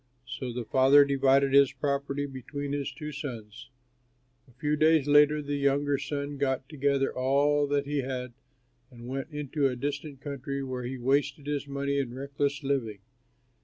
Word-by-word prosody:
So 125 0 -5
the 120 0 -5
Father 135 +3 +6
divided 135 0 +3
his 140 -1 +6
property 140 +1 -2
between 140 +1 -6
his 145 -1 -2
two 150 -2 -7
sons. 120 -6 -8 0.8
A - - -20
few 150 +4 -1
days 155 -1 +4
later, 150 +1 +5
the 145 0 -2
younger 140 0 +1
son 145 0 -4
got 135 -1 -1
together 140 -2 0
all 145 +3 +2
that 140 0 0
he 145 0 -1
had 125 -2 -4 0.6
and 120 -1 -12
went 135 +3 -4
into 150 -1 -1
a 130 - -2
distant 140 +2 -4
country 140 -1 -5
where 130 -2 -4
he 130 +2 -4
wasted 140 +3 0
his 145 -1 -3
money 140 0 -1
in 125 -3 -3
reckless 140 +1 -2
living. 120 -8 -2
140 Hz, 165 wpm, -28 LUFS, 130-145 Hz, 0.8 s, Father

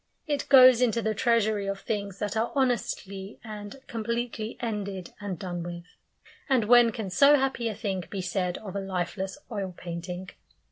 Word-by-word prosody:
It 290 -3 -2
goes 255 -3 +8
into 230 -2 +2
the 220 - +1
treasury 215 -2 +2
of 195 0 -2
things 200 -3 -3
that 210 +2 -3
are 225 +2 0
honestly 210 -6 -1
and 210 -1 -7
completely 235 0 -3
ended 200 -6 -4
and 200 -3 -4
done 175 0 -4
with. 175 0 -6 0.7
And 260 -4 +4
when 240 +1 +6
can 220 -5 -5
so 280 +9 +7
happy 265 -3 0
a 215 - -4
thing 190 -5 -3
be 200 - -4
said 180 0 -1
of 200 -3 -8
a - - 0
lifeless 190 +1 -3
oil 195 -4 -4
painting? 175 +1 -6
205 Hz, 170 wpm, -27 LUFS, 190-235 Hz, 0.7 s, goes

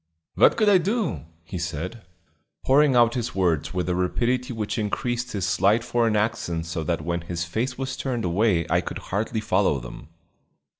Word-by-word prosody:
"What - - +5
could 215 -2 +3
I 200 -3 +6
do?" 200 - -1 0.2
he 90 +2 -6
said, 85 +7 -4 0.6
pouring 140 0 +4
out 120 -1 +5
his 120 -6 -3
words 85 -5 +1
with 90 -1 -2
a 90 - +1
rapidity 120 +8 0
which 110 0 -3
increased 120 +4 -2
his 100 -3 -1
slight 100 +6 +2
foreign 115 -2 +1
accent 105 -6 -1
so 85 -1 -3
that 85 0 -1
when 85 0 -1
his 85 0 -4
face 120 +9 -2
was 130 0 -3
turned 120 -6 -3
away 90 -1 +2
I - - +2
could - - -6
hardly 110 +2 -2
follow 95 -8 +1
them. - - -10
105 Hz, 180 wpm, -24 LUFS, 85-120 Hz, 0.6 s, I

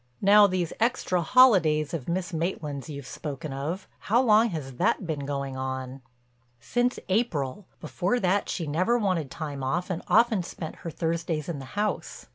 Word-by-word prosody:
Now 205 +1 +7
these 185 -3 -1
extra 225 -6 +1
holidays 170 - +4
of 160 -4 -4
Miss 180 +1 -2
Maitland's 160 -4 -3
you've 140 -3 -7
spoken 145 +1 -6
of—how 180 - -2
long 230 -2 +5
has 135 - -6
that - - +1
been 145 -4 -3
going 140 -2 -3
on?" 130 0 -4 0.6
"Since 245 - 0
April. 185 - -1
Before 175 - -1
that 190 0 +1
she 170 - -2
never 185 +11 +1
wanted 185 - 0
time 150 -5 -5
off 175 +8 -1
and 175 - -3
often 230 -3 +4
spent 165 -2 -7
her 170 - -6
Thursdays 165 -1 -2
in 165 -5 -4
the 135 - -8
house. 210 0 -2
165 Hz, 160 wpm, -27 LUFS, 145-200 Hz, 0.6 s, Now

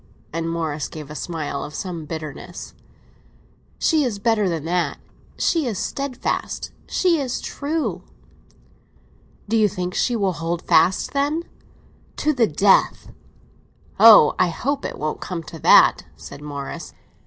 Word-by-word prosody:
And 165 0 -2
Morris 160 -3 -2
gave 150 -2 -9
a - - -8
smile 155 -4 -4
of 150 - -8
some 170 -4 -5
bitterness. 155 +2 -7 1.0
"She 315 -3 +2
is 240 -6 -2
better 215 -2 +1
than 160 -3 -3
that. 175 +1 -1 0.4
She 325 -6 +1
is 220 -5 -2
steadfast—she 280 - -2
is 260 -3 -2
true!" 280 - -3 1.5
"Do 225 - 0
you 215 -2 +4
think 180 0 -4
she 245 - +1
will 195 -4 0
hold 165 +2 -3
fast, 185 - +3
then?" 290 +4 0 0.7
"To 305 +1 +1
the 240 -5 +3
death!" 195 +5 +2 0.9
"Oh, 220 -9 +9
I 185 - +4
hope 265 - -2
it - - -5
won't 155 +1 -3
come 175 -3 -5
to 160 +1 -10
that," - - +6
said - - -11
Morris. 145 -2 -7
185 Hz, 135 wpm, -22 LUFS, 160-245 Hz, 1.5 s, Oh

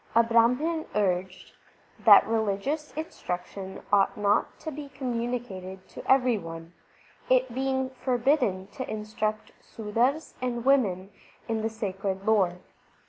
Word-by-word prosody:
A 230 - +7
Brahman 250 +8 +2
urged: 185 -2 -1 0.5
That - - +9
religious 225 +8 -1
instruction 190 - -5
ought 200 +3 +4
not 205 0 +1
to 315 - -5
be 290 0 -7
communicated 235 -8 -4
to - - -9
every 250 -4 +4
one, 165 -1 -9 0.6
it 255 -1 +3
being 265 0 -1
forbidden 250 -6 +1
to 260 - -6
instruct 215 0 -3
Sudars 235 +8 -1
and 240 -1 -2
women 200 -9 +2 0.4
in 225 -1 -1
the 220 - 0
sacred 195 -3 -4
lore. 190 -5 +2
225 Hz, 120 wpm, -27 LUFS, 195-260 Hz, 0.6 s, That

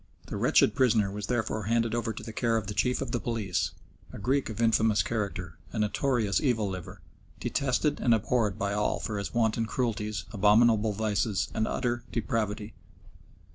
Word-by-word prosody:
The - - -6
wretched - - +4
prisoner 115 -7 +3
was 105 +1 -5
therefore 110 -3 -1
handed 115 +1 +1
over 115 -1 -1
to - - -8
the 110 - -7
care 115 0 +1
of 110 - -2
the 105 - -4
Chief 125 +5 +1
of - - -6
the 120 - 0
Police, 110 -7 -1 0.4
a - - -8
Greek 130 +6 0
of 110 - -6
infamous 110 -2 +3
character, 100 -6 -3
a - - -6
notorious 105 -2 +1
evil 115 -7 +1
liver, 95 0 -7 0.4
detested 140 +2 0
and 120 - +2
abhorred 110 -2 +2
by 100 0 -1
all 105 0 0
for 105 -2 -3
his 100 - -5
wanton 115 -1 +1
cruelties, 105 -5 -2
abominable 110 +1 +4
vices, 105 -1 0
and 110 - 0
utter 120 -1 -1
depravity. 110 -2 -2
110 Hz, 175 wpm, -28 LUFS, 105-120 Hz, 0.4 s, wretched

